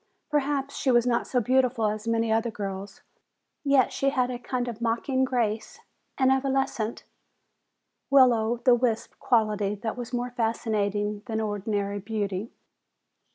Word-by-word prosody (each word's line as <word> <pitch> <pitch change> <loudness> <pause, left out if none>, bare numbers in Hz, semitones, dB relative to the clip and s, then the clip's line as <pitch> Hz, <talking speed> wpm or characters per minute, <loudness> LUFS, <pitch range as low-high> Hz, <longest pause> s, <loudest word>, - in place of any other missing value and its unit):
Perhaps 280 -1 0
she 270 - 0
was 240 -1 +4
not 240 -1 +1
so 250 - +1
beautiful 250 -1 +2
as 215 +1 -2
many 230 -1 +1
other 225 +1 +1
girls. 195 -2 -6 0.6
Yet 275 -3 +3
she 275 - +1
had 255 -2 0
a 245 - -5
kind 245 0 -3
of 235 -1 -6
mocking 240 +3 0
grace, 230 -4 -2 0.4
an 260 -1 +4
evanescent, 265 -4 0 1.1
will 260 -3 +7
o' 225 +1 0
the 250 +1 +4
wisp 235 -2 0
quality 210 -3 +1
that 220 +2 -4
was 245 -1 -6
more 245 0 -2
fascinating 210 -3 -1
than 220 -2 -2
ordinary 205 -1 -2
beauty. 205 0 -3
230 Hz, 145 wpm, -26 LUFS, 215-255 Hz, 1.1 s, will